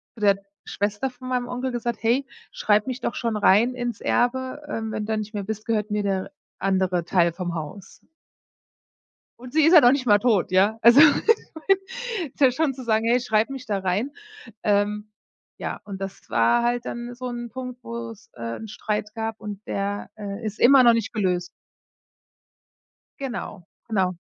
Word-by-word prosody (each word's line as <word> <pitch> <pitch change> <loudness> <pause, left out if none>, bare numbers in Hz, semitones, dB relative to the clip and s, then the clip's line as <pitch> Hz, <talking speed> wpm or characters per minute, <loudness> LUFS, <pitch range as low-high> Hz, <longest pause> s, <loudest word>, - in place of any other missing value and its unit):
zu - - -14
der 200 -1 +4 0.3
Schwester 205 +6 -2
von 255 0 -10
meinem 250 -1 -1
Onkel 250 +1 -3
gesagt: 240 -1 -3
„Hey, 240 +5 +2 0.3
schreib 210 0 +2
mich 255 0 -3
doch - - -2
schon 230 -2 -1
rein 215 +5 +4
ins 240 -3 -4
Erbe, 260 +3 0
ähm, 220 -1 -4
wenn 210 - -3
du 220 0 -1
nicht 215 +1 -5
mehr 205 -2 -3
bist, 215 +1 -5
gehört 215 -2 -1
mir 210 0 0
der 195 +5 -2 0.3
andere 185 -3 +1
Teil 170 -2 +3
vom 175 0 -4
Haus.“ 160 +5 -7 1.4
Und 255 +2 -11
sie 315 - +4
ist 325 - +5
ja 340 - +10
noch 245 -1 +6
nicht 275 -2 0
mal 205 -3 +5
tot, 215 -6 +2
ja? 205 +4 +3
Also, 235 +4 +8
ist 385 - +1
ja 265 - +6
schon 270 +1 0
zu 260 -1 -9
sagen: 220 0 +1
„Hey, 245 +2 +4
schreib 220 -1 +1
mich 270 -1 -7
da 205 -4 -1
rein.“ 195 +8 -1 0.5
Ähm, 210 +1 0 0.5
ja, - - -5
und 195 -2 -7
das 195 0 -7
war 115 - +3
halt 240 0 0
dann 240 +1 -6
so 255 +1 -7
'n 240 -1 -5
Punkt, 250 0 -8
wo's, 230 -2 -7
äh, 115 -1 -5
'n 220 - -8
Streit 210 0 -3
gab 225 0 -4
und 210 -1 -8
der, 200 +1 -3
äh, 205 +1 -6
ist 215 0 -5
immer 265 +1 +7
noch 235 - +8
nicht 230 -2 -1
gelöst. 180 -4 0 1.7
Genau, 235 -8 -6 0.2
genau. 185 -4 0
225 Hz, 180 wpm, -24 LUFS, 205-250 Hz, 1.7 s, ja